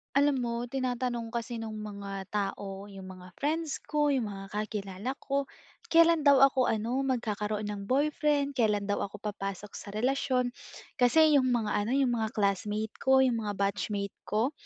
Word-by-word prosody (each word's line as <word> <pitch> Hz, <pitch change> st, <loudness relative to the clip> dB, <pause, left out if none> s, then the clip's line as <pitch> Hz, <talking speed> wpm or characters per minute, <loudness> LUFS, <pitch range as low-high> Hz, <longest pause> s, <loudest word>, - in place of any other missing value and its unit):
Alam 280 Hz, -1 st, +4 dB
mo 235 Hz, -1 st, -1 dB
tinatanong 250 Hz, -2 st, -2 dB
kasi 235 Hz, 0 st, -3 dB
nung 220 Hz, -1 st, -5 dB
mga 200 Hz, -2 st, -6 dB
tao, 200 Hz, -1 st, -3 dB
yung 195 Hz, -2 st, -10 dB
mga 185 Hz, -1 st, -13 dB
friends 310 Hz, +1 st, -2 dB
ko, 295 Hz, -1 st, +1 dB
yung 255 Hz, -7 st, +1 dB
mga 195 Hz, 0 st, -7 dB
kakilala 210 Hz, +1 st, -3 dB
ko, 280 Hz, 0 st, -1 dB, 0.5 s
kelan 330 Hz, -1 st, +6 dB
daw 280 Hz, -2 st, +7 dB
ako 260 Hz, -2 st, +4 dB
ano, 225 Hz, +4 st, 0 dB
magkakaroon 215 Hz, -4 st, -1 dB
ng 205 Hz, -1 st, -4 dB
boyfriend, 285 Hz, +1 st, +2 dB
kelan 210 Hz, -4 st, +1 dB
daw 205 Hz, -, 0 dB
ako 200 Hz, 0 st, -6 dB
papasok 200 Hz, -1 st, -5 dB
sa -, -, -8 dB
relasyon. 250 Hz, +2 st, +1 dB, 0.5 s
Kasi 305 Hz, +5 st, +5 dB
yung 255 Hz, -2 st, +4 dB
mga 225 Hz, -4 st, 0 dB
ano, 220 Hz, -, -2 dB
yung 270 Hz, -3 st, +3 dB
mga 220 Hz, -1 st, -1 dB
classmate 210 Hz, +1 st, -1 dB
ko, 265 Hz, 0 st, +4 dB
yung 245 Hz, -3 st, +2 dB
mga 205 Hz, -, -2 dB
batchmate 200 Hz, 0 st, -1 dB
ko, 225 Hz, +7 st, +1 dB
230 Hz, 165 wpm, -29 LUFS, 205-265 Hz, 0.5 s, daw